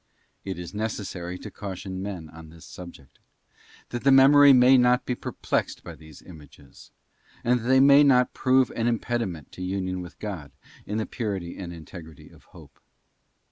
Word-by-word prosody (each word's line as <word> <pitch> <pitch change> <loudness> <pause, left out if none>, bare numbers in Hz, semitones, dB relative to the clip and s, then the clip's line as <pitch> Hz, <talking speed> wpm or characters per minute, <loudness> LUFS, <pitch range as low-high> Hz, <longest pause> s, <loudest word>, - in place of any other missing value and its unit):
It 95 -2 -5
is 90 +2 -8
necessary 95 -5 -5
to - - -10
caution 95 -1 -7
men 95 -5 -6
on 80 0 -13
this 80 0 -15
subject: 85 -7 -13 0.7
that 120 - -5
the 135 - +4
memory 140 +2 +7
may 125 0 +6
not 125 0 +3
be 125 - -1
perplexed - - -3
by - - -9
these 80 -2 -15
images, 75 -5 -16 0.5
and 125 +1 +2
that 115 - -9
they 130 +1 +5
may 140 +1 +7
not 125 -3 +3
prove 130 0 +2
an 115 0 -1
impediment 115 - -3
to - - -11
union 95 0 -3
with 90 -2 -11
God 90 -9 -7 0.4
in 105 - -3
the 110 - -1
purity 100 -7 -5
and 90 -3 -7
integrity 80 -2 -12
of - - -20
Hope. - - -17
100 Hz, 170 wpm, -25 LUFS, 85-125 Hz, 0.7 s, memory